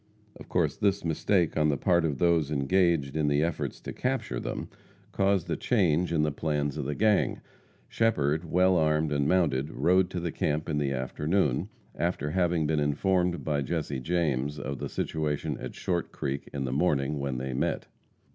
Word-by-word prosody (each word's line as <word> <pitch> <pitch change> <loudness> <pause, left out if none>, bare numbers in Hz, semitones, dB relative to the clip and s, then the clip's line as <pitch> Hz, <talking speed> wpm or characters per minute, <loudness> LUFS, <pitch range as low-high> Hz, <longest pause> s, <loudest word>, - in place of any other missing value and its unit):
Of - - -13
course 80 -5 +1
this 100 -4 +1
mistake 85 +2 +1
on 75 -1 +3
the 70 - +1
part 85 +3 +2
of 75 -4 -1
those 85 -2 +2
engaged 75 0 +1
in 75 -1 +1
the 75 +1 +2
efforts 85 0 -2
to - - -6
capture 125 - -2
them, - - -4 0.4
caused 95 -3 +1
a - - +1
change 90 -7 +1
in 80 -2 +2
the 75 - +1
plans 75 -1 -1
of 75 -3 -3
the 75 +1 -2
gang. 105 -1 +2 0.5
Shepherd, 80 -9 +1
well 90 +2 +3
armed 75 -1 +2
and 70 -1 +1
mounted, 75 -5 +2
rode 90 +2 +2
to 90 - -3
the 85 -1 -3
camp 75 +1 -1
in 75 - 0
the 70 -2 0
afternoon, 70 +4 0 0.2
after 75 +1 -2
having 85 -2 +1
been 75 0 +1
informed 85 +2 +1
by 75 -1 0
Jesse 70 -2 -2
James 75 -2 -1
of 70 -1 -5
the - - -4
situation 75 -1 -2
at - - -7
Short 90 -3 -2
Creek 70 0 -4
in 70 -2 -3
the 65 - -2
morning 70 -2 +1
when 70 -2 -2
they 65 +1 -3
met. 65 - -1
75 Hz, 185 wpm, -28 LUFS, 70-90 Hz, 0.5 s, on